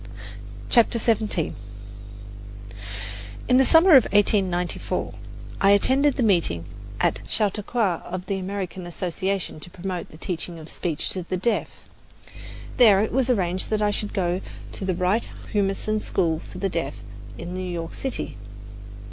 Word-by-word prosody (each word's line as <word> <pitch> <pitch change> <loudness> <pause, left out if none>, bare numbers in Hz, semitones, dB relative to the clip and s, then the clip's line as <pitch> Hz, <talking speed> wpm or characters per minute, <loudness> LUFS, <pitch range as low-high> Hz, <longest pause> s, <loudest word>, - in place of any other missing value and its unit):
CHAPTER 235 0 +4
XVII 215 -7 +1 1.9
In 250 - +5
the 265 - +6
summer 330 +7 +6
of 265 -6 +9
1894, 190 -4 +1 0.5
I 195 - +5
attended 260 +8 +4
the 255 - +1
meeting 170 - +2 0.3
at - - +1
Chautauqua 210 -2 0
of 180 0 -5
the 195 -2 -2
American 185 -1 -4
Association 185 0 -2
to 175 - -10
Promote 180 0 -5
the 155 - -13
Teaching 170 0 -4
of 160 -1 -10
Speech 165 -4 -3
to 185 - -3
the 185 +1 -3
Deaf. 230 +6 0 1.1
There 210 -6 +7
it 220 - -2
was 260 0 +1
arranged 185 -6 0
that 215 -1 +1
I 205 - +3
should 210 +1 -3
go 180 -1 0 0.3
to 195 - -3
the 185 -2 0
Wright 185 +6 +1 0.2
Humason 205 +1 0
School 165 -6 0
for - - -9
the 195 +2 0
Deaf 165 -6 -2 0.4
in 175 - -6
New 185 - -3
York 165 -2 -4
City. 265 - -4
195 Hz, 145 wpm, -24 LUFS, 175-215 Hz, 1.9 s, of